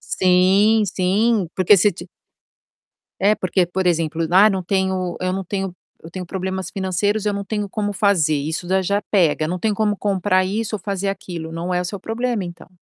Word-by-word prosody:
Sim, 190 +4 +3
sim 195 +2 +1
porque 185 +2 +5
se 200 +2 +3
ti 175 - -11 1.1
é 205 +2 +3
porque 185 -1 +1
por 190 +1 -2
exemplo: 165 -1 0
"Ah 200 +4 +7
não 190 -3 -2
tenho 190 -1 -1
eu 185 0 -1
não 195 0 -3
tenho 190 -1 -4 0.3
eu 165 - -9
tenho 185 0 -6
problemas 190 +1 -4
financeiros 200 +2 -1
eu 210 - +1
não 200 0 -3
tenho 210 -1 -3
como 205 0 -2
fazer" 185 -6 +2
isso 155 +4 -3
já 190 +1 +2
já 200 +2 0
pega, 160 -6 +2
não 180 +2 -3
tem 215 +3 0
como 210 0 0
comprar 190 -2 +1
isso 215 +3 -2
ou - - -5
fazer 195 0 -3
aquilo, 175 -4 -6
não 170 +2 -3
é 180 - +1
o - - -4
seu 195 +3 -5
problema 230 0 -2
então. 175 -1 -9
190 Hz, 195 wpm, -20 LUFS, 180-205 Hz, 1.1 s, Ah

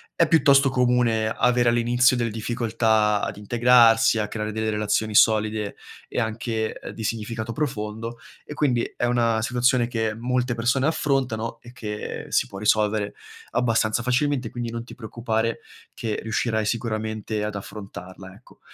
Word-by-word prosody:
è 170 - +3
piuttosto 140 -4 +5
comune 120 -3 +2
avere 120 +1 +2
all'inizio 120 +2 +3
delle 115 -2 -1
difficoltà 110 -2 +1
ad 100 0 -3
integrarsi, 115 +1 +4
a 105 -1 -1
creare 105 0 -4
delle 110 0 -1
relazioni 105 +1 0
solide, 110 -1 +3 0.3
e - - -3
anche, 110 0 -2
ehm, - - -8
di 110 - -7
significato 115 +1 -3
profondo. 115 -4 -4 0.3
E 150 - -9
quindi 125 -5 +1
è 120 - 0
una 115 -2 +1
situazione 125 0 +2
che 110 -2 -2
molte 125 +1 -1
persone 125 +5 +1
affrontano 125 -7 -1
e 120 - -13
che 105 -4 -6
si - - +1
può 100 - -10
risolvere 105 0 +1 0.4
abbastanza 115 -2 +1
facilmente, 125 -1 0
quindi 120 -1 -5
non 115 0 -5
ti - - -12
preoccupare, 115 -1 -2 0.3
che 110 -2 -3
riuscirai 110 -1 -1
sicuramente 110 -1 -2
ad 105 0 -3
affrontarla 95 -2 -9
ecco. 110 +6 -20
115 Hz, 145 wpm, -24 LUFS, 110-120 Hz, 0.4 s, piuttosto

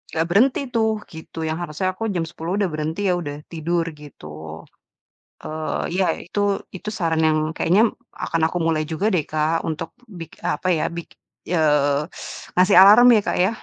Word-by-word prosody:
gak 160 - +2
berhenti 240 +9 +3
tuh, 220 -2 0
gitu, 160 0 -8
yang 160 +2 -2
harusnya 175 +2 -3
aku 225 +4 -4
jam 170 - 0
10.00 165 +3 -4
udah 200 -3 0
berhenti 155 +4 -3
ya, - - +3
udah 145 -4 -5 0.2
tidur, 170 +1 -1
gitu. 80 - -10 0.8
Eee, 155 0 -3
ya, 190 - +3 0.2
itu 180 - -4 0.4
itu 190 - -6
saran 165 -3 0
yang 155 0 +2 0.2
kayaknya 185 +6 +3 0.4
akan 165 - -1
aku - - -3
mulai 155 -1 +1
juga 180 +6 -2
deh 175 - +3
Kak 155 +1 +1
untuk, 160 - -4 0.3
bik 165 - -8
apa 150 - -3
ya, - - -1
bik 170 - -6 0.5
eee, 150 -3 +3 0.6
ngasih 185 +2 +5
alarm 210 +5 +8
ya 215 - +4
Kak - - 0
ya? 190 - +3
165 Hz, 170 wpm, -22 LUFS, 155-185 Hz, 0.8 s, alarm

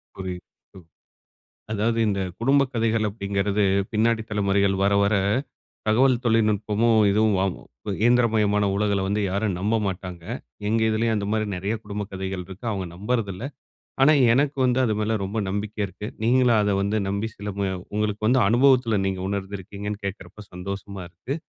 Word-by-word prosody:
புரியுது. 90 -2 -5 0.4
ப் - - -25 0.9
அதாது 110 +2 0
இந்த 100 -1 0 0.2
குடும்ப 140 +3 +4
கதைகள் 110 -1 +1
அப்டிங்கிறது 100 0 -1 0.3
பின்னாடி 110 +1 +2
தலமுறைகள் 100 -1 +2
வர 100 - +3
வர 100 +1 +2 0.7
தகவல் 125 +2 +3
தொழில்நுட்பமும் 110 0 +2
இதுவும் 105 0 +3
வாங்கு 95 -1 -1 0.4
இயந்திரமயமான 110 -4 +3
உலகில 100 -1 +1
வந்து 105 +2 0
யாரும் 100 -1 -1
நம்ப 105 +4 0
மாட்டாங்க. 90 -2 -5 0.5
எங்க 115 +1 +2
இதுலேயும் 110 +1 +1
அந்த 100 -1 -2
மாரி 110 -1 0
நிறைய 100 +5 -2
குடும்ப 105 0 -4
கதைகள் 95 -1 -4
இருக்கு. 95 +5 -11
அவங்க 95 -3 -3
நம்புறதில்ல 105 -1 -2 0.6
ஆனா 150 +3 +6 0.2
எனக்கு 140 +2 +1
வந்து 125 0 +2
அது 110 -3 +1
மேல 110 +1 0
ரொம்ப 100 +3 -4
நம்பிக்கை 105 +2 -3
இருக்கு. 100 +2 -8 0.2
நீங்களும் 120 0 +4
அத 105 0 +1
வந்து 100 +2 0
நம்பி 100 +3 -1
சில 105 +1 -6 0.4
உங்களுக்கு 105 0 -1
வந்து 130 +2 +4
அனுபவத்தில 120 -2 +4
நீங்க 95 -1 -1
உணர்ந்திருக்கீங்கன்னு 100 +1 -5
கேட்குறப்ப 95 +1 -7
சந்தோஷமா 100 +1 -6
இருக்குது. 125 - -5
105 Hz, 145 wpm, -24 LUFS, 100-115 Hz, 0.9 s, ஆனா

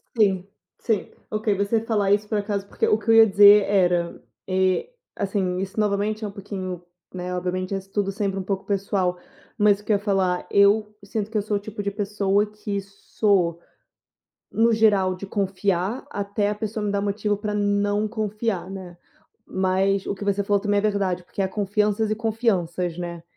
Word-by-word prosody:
Sim, 195 -4 +2 0.3
sim, 220 -5 -1 0.2
ok. 215 -1 0
Você 205 +3 +1
falar 210 -4 0
isso 205 +1 +2
por 215 - -1
acaso, 200 -1 -2
porque - - -1
o 215 - +4
que 220 +1 -7
eu 225 - +7
ia 225 0 +8
dizer 205 +1 +8
era, 175 -3 +1 0.3
eh, 185 - +1 0.3
assim, 190 -2 -1
isso 195 +2 -4
novamente 210 +1 0
é - - -2
um - - -7
pouquinho, 190 -3 -6 0.3
né, 180 0 -4
obviamente, 185 +2 -2
isso 195 0 -7
tudo 200 -2 0
é - - -4
sempre 195 -1 -2
um - - -3
pouco 195 0 -3
pessoal, 195 -2 0 0.4
mas 205 -2 +4
o 210 - -17
que - - -1
eu - - +5
ia - - -8
falar: 190 -3 0
eu 210 +1 +4
sinto 205 +1 -3
que 220 - -1
eu 210 - +2
sou 210 0 -1
o - - -4
tipo 205 0 -6
de 200 - -1
pessoa 205 0 +1
que 210 -1 -4
sou, 195 -3 0 0.9
no 230 +1 +3
geral, 205 -4 +3
de 200 - -7
confiar 195 +2 -1
até 205 +1 -1
a - - -1
pessoa 215 0 -4
me 205 - -1
dar 200 - 0
motivo 205 +1 -1
para 210 0 -4
não 205 +1 +1
confiar, 210 -3 -2
né. 185 -3 -8 0.6
Mas 190 +1 +1
o - - -1
que 195 - -12
você 200 0 0
falou 200 0 +2
também 205 0 +1
é - - +3
verdade, 195 -4 0
porque 195 - -4
há 190 - 0
confianças 210 +2 0
e - - +2
confianças, 195 -7 -1
né. 170 -1 -5
200 Hz, 195 wpm, -24 LUFS, 190-210 Hz, 0.9 s, ia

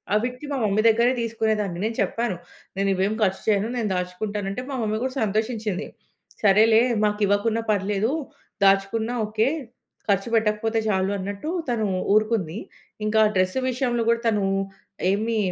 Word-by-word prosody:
అవిటికి 250 +6 -2
మా 280 - -1
మమ్మీ 210 +1 +2
దగ్గరే 235 +3 +3
తీసుకునేదాన్ని. 220 -5 -1
నేను 225 - -2
చెప్పాను. 230 -5 -1 0.4
"నేను 195 0 +1
ఇవేం 190 +3 +1
ఖర్చు 190 -1 0
చేయను. 210 +1 +2
నేను 225 -3 -1
దాచుకుంటాను" 195 +3 -3
అంటే 200 - -4
మా 275 - -3
మమ్మీ 215 0 -1
కూడా 260 - -3
సంతోషించింది. 215 -1 -1 0.6
"సరేలే 220 +3 +6 0.3
మాకు 210 0 0
ఇవ్వకున్నా 210 +3 +1
పర్లేదు. 205 +3 0 0.5
దాచుకున్నా 195 +4 +2
ఓకే. 215 +3 +1 0.6
ఖర్చు 195 +3 +1
పెట్టకపోతే 220 +1 +1
చాలు" 190 -1 +1
అన్నట్టు 200 +10 -5 0.2
తను 225 -3 0 0.3
ఊరుకుంది. 215 -5 +1 0.5
ఇంకా 220 +1 +3
డ్రెస్ 185 +4 +1
విషయంలో 245 -2 0
కూడా 230 0 +2
తను 210 -3 +2 0.7
ఏమి 220 +3 0
215 Hz, 140 wpm, -24 LUFS, 200-230 Hz, 0.7 s, సరేలే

